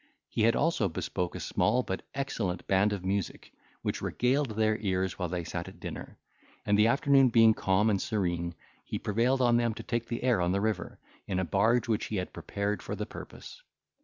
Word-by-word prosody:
He - - -2
had 115 +1 +4
also 145 - +1
bespoke 90 +2 -3
a - - -4
small 125 - +1
but 95 - -3
excellent 105 -10 -2
band 95 +2 +3
of 95 -3 -4
music, 100 0 -3 0.3
which - - -2
regaled 125 -1 0
their 110 0 +2
ears 95 -3 -1
while 90 -2 -1
they 90 0 -2
sat 85 +1 -5
at - - -12
dinner; - - -7 0.5
and 105 - +3
the 105 +2 +5
afternoon 135 +1 +4
being 115 -1 +6
calm 95 +1 +2
and 100 -3 +2
serene, 85 -5 -1 0.3
he - - -4
prevailed 120 +5 +1
on 120 -1 +4
them 120 -2 +1
to - - -7
take 115 -1 -2
the 120 - -4
air 125 -7 +3
on 90 +1 +1
the 100 - +1
river, 105 -4 -2 0.3
in 95 - -1
a 95 - 0
barge 110 +7 +2
which 110 -2 0
he 110 - -4
had 90 -2 -3
prepared 100 +1 -3
for - - -5
the - - -3
purpose. - - -10
105 Hz, 205 wpm, -29 LUFS, 95-120 Hz, 0.5 s, being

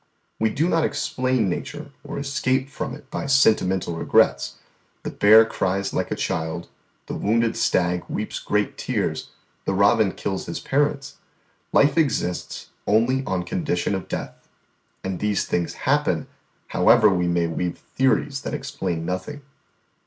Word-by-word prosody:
"We 110 - +2
do 150 +9 0
not 165 -2 +2
explain 130 -5 0
nature 145 - -5
or - - -6
escape 135 -1 0
from - - -4
it 135 - -16
by - - -3
sentimental 95 -10 +3
regrets: 80 - +2 0.5
the - - -5
hare 110 +2 +8
cries 100 -2 -1
like - - -1
a - - -1
child, 80 +1 -3 0.4
the - - -6
wounded 115 +2 +1
stag 90 -5 +1
weeps - - -3
great 105 -1 -1
tears, - - -2 0.4
the 95 - 0
robin 100 0 +4
kills 95 -1 -4
his 85 - -4
parents; 145 0 -1 0.5
life 145 +2 +4
exists 115 - -1 0.2
only 120 +6 +3
on 90 -1 -1
condition 100 - -1
of 95 - -3
death; - - -6 0.6
and 95 -2 -3
these 105 -2 0
things 85 -1 -1
happen - - +2 0.4
however 115 -2 +5
we 90 -2 +1
may 85 -1 +1
weave 85 +1 -2
theories 135 +1 0
that - - -4
explain 95 - -3
nothing. 115 +12 -4
110 Hz, 145 wpm, -23 LUFS, 90-135 Hz, 0.6 s, hare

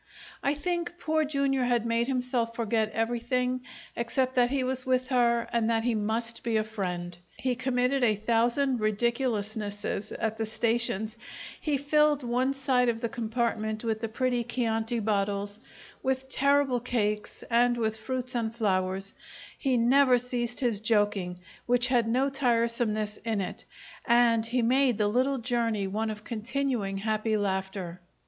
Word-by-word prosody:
I 280 +1 +1
think 345 +2 -2
Poor 315 -2 +1
Jr. 275 -2 0
had 245 -2 +1
made 230 +1 +1
himself 250 -3 -1
forget 220 -1 0
everything 240 +2 -1 0.3
except 255 +2 0
that 245 -1 +3
he 270 0 0
was 260 0 -2
with 255 0 0
her 235 -2 +2
and 230 -1 +2
that 225 -1 +1
he 240 0 +1
must 225 +2 -2
be 230 -2 +1
a 215 - +2
friend. 180 -5 -4 0.2
He 255 -1 0
committed 250 +1 0
a 220 -3 +4
thousand 235 +5 +1
ridiculousnesses 215 -2 -1
at 220 0 -2
the 220 - -1
stations; 220 -1 -1 0.4
he 295 -3 +1
filled 295 0 +3
one 250 +3 0
side 255 -2 +2
of 225 -1 -1
the 235 - -1
compartment 225 -1 -2
with 220 -1 -1
the 225 - -1
pretty 245 +1 0
chianti 230 -1 -1
bottles, 205 -1 -1 0.4
with 265 0 -1
terrible 280 -2 +3
cakes, 210 -4 -2
and 240 +1 +4
with 220 -2 0
fruits 255 +3 -4
and 230 -2 -2
flowers; 195 -2 -1 0.4
he 265 -3 +1
never 255 +2 +5
ceased 245 0 -3
his 230 -5 +1
joking, 205 -5 +1 0.3
which 245 +1 +3
had 240 -3 +3
no 255 +4 +2
tiresomeness 230 -5 0
in 225 -2 -2
it, 185 - -5 0.4
and 235 -1 +4
he 245 +1 +1
made 255 0 +3
the 210 - +2
little 255 +6 +1
journey 230 -4 0
one 215 +3 -2
of 210 0 -6
continuing, 230 -3 -2
happy 215 +1 0
laughter. 190 -3 -3
235 Hz, 155 wpm, -28 LUFS, 215-255 Hz, 0.4 s, never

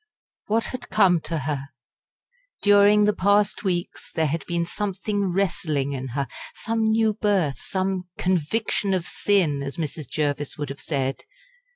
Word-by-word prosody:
What 225 +2 +2
had 255 - -6
come 190 -5 +4
to 165 - -2
her? 140 -1 -3 0.9
Daring 205 +1 +6
the 210 0 +4
past 200 +1 +2
weeks 180 -3 -2
there 160 - +1
had 155 +1 -1
been 170 -1 0
something 200 +1 -2
wrestling 155 -7 0
in 130 -1 -4
her 140 -1 0 0.3
some 225 0 -1
new 220 0 +3
birth 200 -9 +1
some 190 -1 -2
"conviction 190 +3 0
of 175 -2 -2
sin," 175 -9 +1
as 140 +4 -5
Mrs. 155 -2 -4
Jervis 145 -1 -1
would 145 -2 -4
have 140 0 -7
said. 135 -3 -2
180 Hz, 150 wpm, -24 LUFS, 150-205 Hz, 0.9 s, Daring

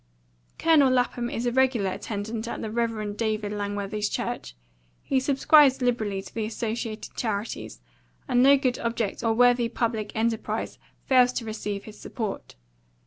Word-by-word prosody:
Colonel 310 -5 +5
Lapham 245 -1 0
is 235 - -3
a 240 - +1
regular 245 -6 +2
attendant 220 +3 -4
at - - -4
the 220 - -4
Rev. 220 -3 -2
Dr. 215 -2 -1
Langworthy's 205 0 -2
church. - - -4 0.5
He 270 - +1
subscribes 275 0 +5
liberally 220 -6 -1
to - - -13
the 225 - -2
Associated 220 0 -4
Charities, 210 - -4 0.5
and 245 - +3
no 280 +2 +7
good 255 -2 0
object 230 -2 -2
or 225 -1 +2
worthy 245 0 +4
public 230 -3 -2
enterprise 225 0 -2 0.3
fails 250 -2 +5
to 235 - -3
receive 210 -2 -4
his 215 -1 -12
support. 220 -5 -5
230 Hz, 145 wpm, -26 LUFS, 210-245 Hz, 0.5 s, no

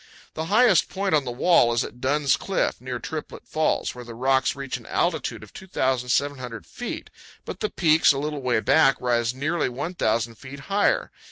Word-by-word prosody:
The 160 - -4
highest 210 0 +4
point 195 -1 -2
on 145 -3 +3
the 125 - -3
wall 120 -1 +4
is 115 - +1
at 125 - -10
Dunn's 140 +1 +2
Cliff, 195 - -1
near 125 -1 -4
Triplet 150 +6 -7
Falls, 155 0 0
where 125 - -9
the 120 -1 -10
rocks 130 +3 +1
reach 140 -1 -5
an 115 - -15
altitude 150 -10 -1
of 110 - -14
2,700 130 - -2
feet, - - -7 0.3
but - - -7
the 215 - -1
peaks 160 -2 +4
a 140 - -1
little 150 0 -3
way 120 -3 +1
back 135 0 +4
rise 120 -1 0
nearly 150 +4 -1
1,000 120 -5 -1
feet 135 +4 -11
higher. 200 +7 +1
135 Hz, 180 wpm, -24 LUFS, 125-160 Hz, 0.3 s, highest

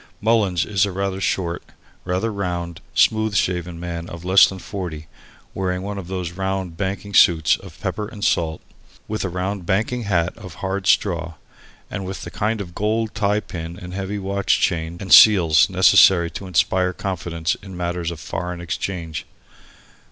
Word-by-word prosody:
Mullins 105 -6 +2
is 100 -3 +1
a - - -4
rather 95 0 -3
short, 85 -3 -1 0.4
rather 95 +5 -1
round, 85 -4 -4
smooth 110 -1 +3
shaven 90 -3 -1
man 85 0 -5
of 85 +1 -9
less 95 +1 +7
than 95 - -6
forty, 90 -5 -6 0.5
wearing 90 -1 -2
one 100 0 -4
of 90 - -8
those 90 -2 -4
round 95 -1 -3
banking 100 +2 -4
suits 85 -4 +5
of - - -14
pepper 105 -1 -3
and 105 -2 -5
salt, 80 -2 0 0.5
with 110 0 -3
a 95 - -2
round 90 +1 -3
banking 110 +5 0
hat 90 -3 0
of 95 -7 -11
hard 95 0 -3
straw, 85 -5 +1 0.6
and 100 - -4
with 95 0 -6
the - - -7
kind 110 +1 -1
of 85 -3 -8
gold 110 +2 -1
tie 105 0 +1
pin 85 -2 -7
and 90 0 -9
heavy 95 +2 -3
watch 100 0 0
chain 85 -1 -1
and 95 - +1
seals 85 -7 +7
necessary 95 -2 +5
to 95 +4 -7
inspire 90 +1 +1
confidence 85 -2 -2
in 95 -2 -10
matters 85 -1 -2
of 85 -2 -7
foreign 90 +4 -5
exchange. 85 -2 -4
95 Hz, 165 wpm, -21 LUFS, 85-100 Hz, 0.6 s, less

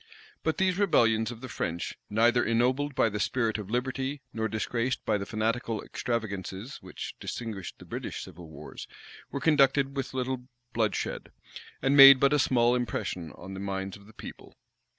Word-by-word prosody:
But 160 - -1
these 190 0 +1
rebellions 115 - +3
of 120 -1 -8
the 130 - -6
French, 85 -8 -3
neither 120 +3 +3
ennobled 125 +5 +1
by - - +4
the 105 -1 -3
spirit 115 -1 0
of 100 -2 -7
liberty, 130 +3 -2
nor 110 0 -1
disgraced 115 +3 -2
by 105 -2 +1
the 100 - -5
fanatical 110 +1 -1
extravagancies 110 -1 -4
which - - -7
distinguished 110 -6 -5
the - - -13
British - - -5
civil 85 -2 -11
wars, 75 -2 -9 0.4
were - - -4
conducted 140 -3 +3
with 135 -1 -4
little 130 -1 -2 0.3
bloodshed, 110 -3 -1 0.5
and 135 +1 +3
made 135 -1 +11
but 140 +2 +4
a 150 - +3
small 120 -2 +3
impression 100 -9 -2
on 95 +2 -10
the 95 - -6
minds 95 -1 -3
of 100 0 -16
the 110 - -16
people. - - -11
120 Hz, 170 wpm, -28 LUFS, 105-130 Hz, 0.5 s, made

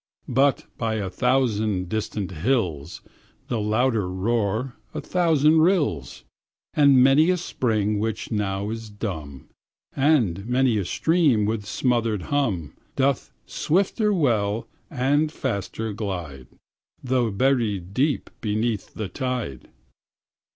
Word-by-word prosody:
But 135 +1 +3
by 110 -2 -1
a 100 -3 -3
thousand 110 -5 +1
distant 105 -1 -3
hills 85 - -1 0.5
The 120 - -1
louder 110 -1 +1
roar 110 +5 -1 0.2
a - - -2
thousand 160 -3 +3
rills, 160 - +1 0.5
And 140 -4 +6
many 140 +5 +5
a 185 - +3
spring 110 - -1
which 110 +2 -3
now 100 -1 -1
is 115 -1 -6
dumb, 80 - -6 0.5
And 120 - +2
many 125 -3 +2
a 95 - -2
stream 150 - +2
with 105 -1 -2
smothered 115 -6 0
hum, 100 - 0 0.2
Doth 135 -1 0
swifter 200 +5 +1
well 115 - +1 0.2
and 145 +2 +1
faster 110 - -3
glide, 85 - -5 0.6
Though 125 -2 +1
buried 105 -5 0
deep 140 +5 0
beneath 110 0 -2
the 110 - -3
tide. 125 - -4
115 Hz, 115 wpm, -24 LUFS, 100-135 Hz, 0.6 s, And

